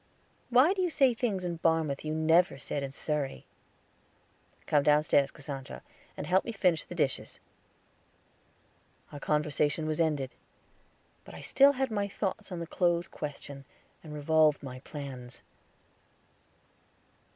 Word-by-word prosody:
Why 255 +9 +5
do 390 - -2
you 360 - +1
say 275 -6 +3
things 215 -6 -2
in 170 -1 -3
Barmouth 160 -4 +1
you 155 0 -2
never 160 0 +3
said 140 +2 -4
in 140 - -3
Surrey?" 140 0 -3 1.2
"Come 145 - +3
downstairs, 150 -1 +3
Cassandra, 135 -2 -8 0.3
and - - -4
help 185 +2 +3
me - - -4
finish 180 -6 +1
the 175 - -9
dishes." 145 -5 -1 1.7
Our 145 - -8
conversation 150 +1 0
was 155 +1 0
ended; 145 -5 0 0.9
but - - -12
I - - -9
still 280 +1 +5
had 265 -2 -1
my 205 -2 0
thoughts 200 0 -4
on 180 - -4
the 170 - -4
clothes 175 +1 +1
question, 145 -2 -7 0.4
and 155 - -10
revolved 150 0 +3
my 130 -2 -7
plans. 130 -3 -8
155 Hz, 135 wpm, -30 LUFS, 145-185 Hz, 1.7 s, Why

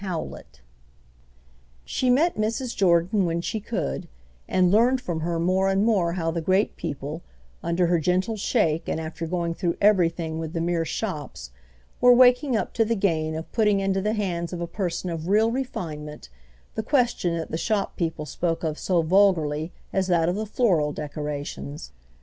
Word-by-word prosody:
CHAPTER 180 -5 -2
VI. - - -11 1.4
She 255 - 0
met 300 +8 +4
Mrs. 230 +3 -2
Jordan 185 +2 +3
when 165 0 -1
she 215 +5 -3
could, 200 -7 -3 0.4
and 180 -1 +3
learned 240 +5 +4
from 175 -9 -3
her 165 +1 -2
more 185 +3 +2
and 195 +2 +2
more 190 -7 +2
how 165 -2 -1
the 165 0 -2
great 190 +5 +1
people, 150 0 -5 0.4
under 170 +2 +1
her 175 0 +2
gentle 185 +6 0
shake 180 -7 0
and - - -1
after 160 +1 -5
going 170 0 -1
through 170 -1 -2
everything 170 -5 +2
with 160 0 -5
the 165 - -2
mere 165 0 0
shops, 150 - -5 0.5
were 245 0 +7
waking 250 +1 +5
up - - -3
to 230 - +3
the 230 +1 0
gain 160 -6 0
of 160 +1 -6
putting 210 -3 +2
into 195 0 0
the 210 +2 0
hands 175 -5 -2
of 175 - -5
a 170 - -2
person 180 0 -3
of 165 0 -5
real 215 +4 +3
refinement 155 - -5 0.4
the - - -2
question 235 - +1
that 165 - -5
the - - -1
shop 210 -1 -1
people 160 -3 -2
spoke 165 +3 -2
of 155 -1 -2
so 175 -3 +1
vulgarly 160 -4 +2 0.2
as 190 -1 +1
that 170 -3 +2
of 175 - +1
the 215 +1 -3
floral 180 -11 +2
decorations. 145 - -6
175 Hz, 180 wpm, -25 LUFS, 165-210 Hz, 1.4 s, were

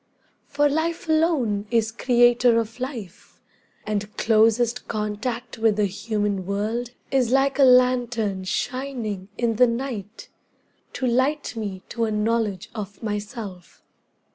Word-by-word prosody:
For 290 +1 +2
life 325 +4 -1
alone 295 -11 +1
is 225 -2 +1
creator 240 0 +4
of 230 +2 -5
life, 245 - -7 0.5
And 210 0 -3
closest 230 +2 +2
contact 230 +3 -4
with 220 -2 +3
the 210 0 +2
human 205 -1 -2
world 215 +4 -2 0.2
Is 255 -4 +2
like 270 +1 +2
a - - +7
lantern 245 -6 +3
shining 235 -4 -3
in 230 -2 0
the 250 - +6
night 230 -4 -5 0.6
To 260 - -3
light 260 +4 +1
me 200 -4 -5
to 230 -1 -1
a 220 - -2
knowledge 215 -2 -1
of 205 -1 -7
myself. 205 - -6
230 Hz, 125 wpm, -24 LUFS, 210-250 Hz, 0.6 s, a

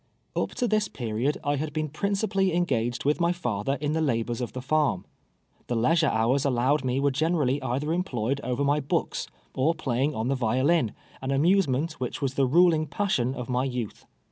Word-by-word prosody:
Up - - -1
to 245 - 0
this 215 -2 +1
period 120 - -2
I 145 0 0
had 150 +1 -3
been 155 -1 -1
principally 195 +2 0
engaged 120 -9 0
with 150 +4 +2
my 170 0 +3
father 125 - -2
in 150 +1 -1
the 160 - 0
labors 120 -4 0
of 120 - -4
the 130 - -4
farm. 145 -9 +1 0.6
The 120 - -1
leis 155 +9 +3
ure 155 - +3
hours 120 +5 +2
allowed 135 +2 +2
me 130 +1 0
were 140 0 +2
generally 145 -2 +1
either 140 +6 -1
employed 140 - -1
over 125 +3 -1
my 145 +1 +2
books, 140 - -2 0.3
or 155 +6 +1
playing 135 0 -1
on 110 +2 -1
the 135 - +2
violin 130 +1 +2
— - - -25
an 130 - -4
amuse 170 +7 +3
ment 155 +5 -2
which 130 +5 -3
was 135 -3 -1
the 135 -1 +2
ruling 160 +1 +4
passion 140 -6 0
of 125 -2 -5
my 125 0 0
youth. 125 -5 -5
140 Hz, 200 wpm, -26 LUFS, 125-160 Hz, 0.6 s, ruling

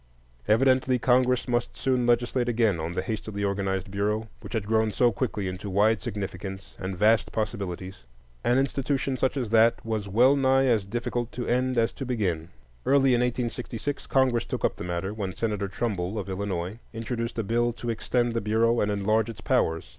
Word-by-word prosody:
Evidently, 130 +2 +3
Congress 125 +1 +2
must 120 -1 -1
soon 125 -2 +1
legislate 120 +1 +2
again 110 -7 +2
on 80 +2 -3
the 90 - -1
hastily 105 -1 -4
organized 95 -1 -1
Bureau, 105 +2 -1
which - - -10
had 110 -3 0 0.3
so 120 -1 +4
quickly 110 -2 -2
grown 95 -1 -2
into 95 +2 -6
wide 105 +3 +3
significance 95 -3 -6
and 95 -1 -4
vast 110 +3 +3
possibilities. 95 -3 -4 0.5
An 120 - +3
institution 135 0 0
such 130 +2 0
as 120 -5 -2
that 115 0 +4
was 110 -3 -2
well 125 +8 +5
nigh 135 -1 +3
as 115 -6 +2
difficult 120 +3 -3
to 125 - -4
end 125 +1 +1
as 115 -1 +2
to - - -6
begin. 95 -10 -1 0.3
Early 135 -2 +4
in 120 - +3
1866 125 +2 -3
Congress 130 -3 +2
took - - -2
up - - -1
the - - -6
matter, 90 +3 -3
when 100 -4 -4
Senator 105 -3 -1
Trumbull, 100 -1 -2
of 100 -2 -4
Illinois, 95 +1 -3
introduced 115 +1 -4
a 115 - 0
bill 120 +3 +1
to 120 0 -4
extend 120 +1 0
the 115 - -1
Bureau 115 +2 +2
and 105 - +1
enlarge 110 +2 +1
its 110 -1 -8
powers. 85 -11 +1
115 Hz, 185 wpm, -26 LUFS, 100-125 Hz, 0.5 s, well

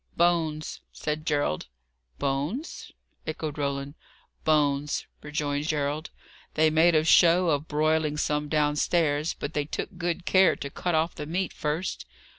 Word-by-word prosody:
"Bones," 160 -3 +1
said 150 0 -4
Gerald. 145 - 0 0.5
"Bones?" 145 - -3 0.4
echoed 155 -1 -4
Roland. 140 0 -2 0.5
"Bones," 145 -2 +1 0.2
rejoined 150 0 -2
Gerald. 150 +1 -1 0.5
"They 155 0 +4
made 165 +2 +4
a 155 - +4
show 170 +2 +5
of 145 +1 -1
broiling 155 0 +1
some 150 0 -1
downstairs, 150 +1 +1
but 145 - -5
they 150 -1 0
took 175 +4 -5
good 175 +1 -2
care 190 -1 +5
to 140 - -6
cut 175 +2 -1
off 160 +2 +1
the 150 - -6
meat 180 +3 -2
first. 155 +5 -3
155 Hz, 135 wpm, -27 LUFS, 145-165 Hz, 0.5 s, show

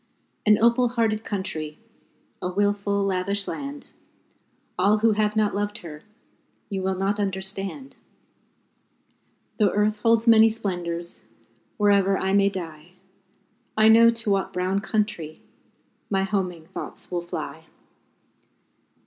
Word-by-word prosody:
An 210 0 +6
opal 235 +2 +4
hearted 225 -2 0
country, 160 -8 -4 0.6
A 180 - -2
wilful, 200 +1 0
lavish 195 +1 -1
land 280 0 -6 0.8
All 200 +4 +3
who 225 +1 +3
have 210 0 0
not 215 -1 +2
loved 205 +1 -2
her, 150 -2 -9 0.7
You 195 -1 -2
will 190 0 -1
not 195 +2 -1
understand 195 +6 -4 1.6
Though 210 -2 +4
earth 210 +2 +1
holds 230 +1 +3
many 225 -1 +7
splendors, 175 -5 -4 0.6
Wherever 200 -2 +3
I 190 0 -1
may 200 0 +4
die, 170 -3 -7 0.8
I 215 0 +6
know 230 +1 +7
to 230 -2 0
what 195 -1 0
brown 185 +2 0
country 205 -7 -2 0.7
My 195 -1 +1
homing 185 -5 -2
thoughts - - -8
will 175 -1 -1
fly. 175 - -6
200 Hz, 120 wpm, -24 LUFS, 185-215 Hz, 1.6 s, many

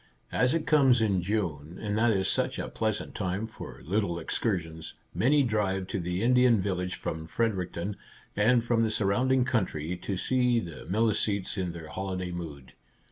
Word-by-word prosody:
As 125 +5 +2
it 165 - -1
comes 135 -5 +5
in 100 -5 +2
June, 85 -5 -2
and 105 -1 -2
that 115 +2 +3
is 95 -3 +1
such - - 0
a - - -3
pleasant 110 -2 -2
time 95 +2 -2
for 110 - -10
little 95 0 0
excursions, 80 -2 -2 0.2
many 145 +4 +4
drive 100 -5 0
to - - -2
the 90 +3 -2
Indian 125 -2 +5
Village 90 -1 -1
from 80 0 -4
Fredericton 95 -2 -1 0.4
and 115 +3 +4
from 120 -1 +2
the 115 - +2
surrounding 125 +5 +2
country, 90 -9 -1
to 95 +2 -3
see 125 +3 +2
the 85 -6 -8
Mili 110 +3 +3
cetes 100 -2 -1
in 90 -4 -2
their 80 -2 -8
holiday 95 -1 -3
mood. 75 -7 -7
100 Hz, 170 wpm, -29 LUFS, 90-115 Hz, 0.4 s, comes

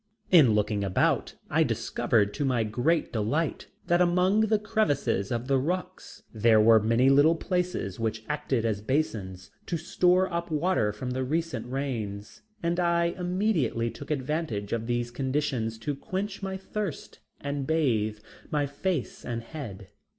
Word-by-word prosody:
In 140 - +7
looking 105 -1 0
about, 95 -2 +1
I - - +2
discovered 105 -2 +1
to 145 - -2
my 125 -4 +1
great 125 +10 0
delight 130 +9 -1 0.2
that 175 +1 +3
among 180 +3 +3
the 220 0 +3
crevices 175 - 0
of 120 +1 -2
the 135 -1 +3
rocks 180 +6 -4
there 110 0 +4
were 110 +1 +7
many 115 +4 +3
little 145 +4 +5
places 180 - -2
which 110 -1 -2
acted 140 -5 -1
as 105 -2 -1
basins 105 -8 -2 0.2
to 170 - -1
store 180 +3 +2
up 170 0 -2
water 155 - +1
from 125 +5 -5
the 130 +1 -1
recent 150 -3 -2
rains, 110 -7 -4 0.2
and 170 +1 0
I 170 -1 +2
immediately 180 - 0
took 145 - -10
advantage 135 -7 -2
of 115 0 -2
these 120 0 -1
conditions 130 -4 -1
to 130 +6 -3
quench 190 +7 -4
my 190 -1 -3
thirst 195 -3 -5 0.2
and 140 -1 -3
bathe 115 -10 +1 0.3
my 150 -1 +1
face 145 +1 -3
and 115 -1 -4
head. 110 -9 -8
140 Hz, 150 wpm, -27 LUFS, 115-170 Hz, 0.3 s, In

